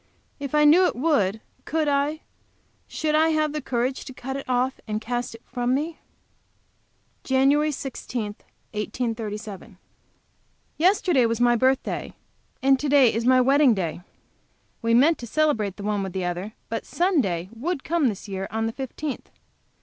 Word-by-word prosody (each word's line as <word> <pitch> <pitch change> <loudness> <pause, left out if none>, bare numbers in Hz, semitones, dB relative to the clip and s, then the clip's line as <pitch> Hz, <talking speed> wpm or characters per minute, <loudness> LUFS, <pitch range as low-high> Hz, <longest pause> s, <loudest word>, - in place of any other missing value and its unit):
If 280 0 -4
I 300 0 +5
knew 350 +5 +7
it - - -2
would, 225 - +1 0.2
could 315 -1 -1
I, 290 +2 0 0.7
should 310 -1 -2
I 315 +1 +4
have 310 -1 +1
courage 250 +1 -1
to 265 - -9
cut 265 +2 -5
it 275 -1 -6
off 255 +1 0
and 215 0 -2
cast 240 +1 -3
it 230 - -15
from 245 +1 -1
me? 315 +4 -3 1.2
JAN. 265 +1 +3 0.2
16, 255 -4 -4 0.5
1837. 215 -2 -4 1.0
Yesterday 350 - +3
was 230 0 -1
my 240 0 +4
birthday, 260 +3 0 0.5
and 270 0 +4
to 290 - -2
day 270 -4 +5
is 230 +1 -1
my 255 0 +6
wedding 270 -1 +5
day. 175 -3 -3 0.8
We 230 0 +2
meant 300 +7 +4
to 235 - -7
celebrate 230 -9 +1
the 200 - -7
one 210 -1 0
with 190 -2 -4
the 185 -1 -2
other, 180 +4 -4
but 225 0 -3
Sunday 220 - 0
would 280 +6 -3
come 330 -4 +1
this 215 -2 -4
year 190 -1 -4
on 225 +1 -2
the 225 - -1
fifteenth. 270 +2 -5
255 Hz, 155 wpm, -24 LUFS, 220-290 Hz, 1.2 s, knew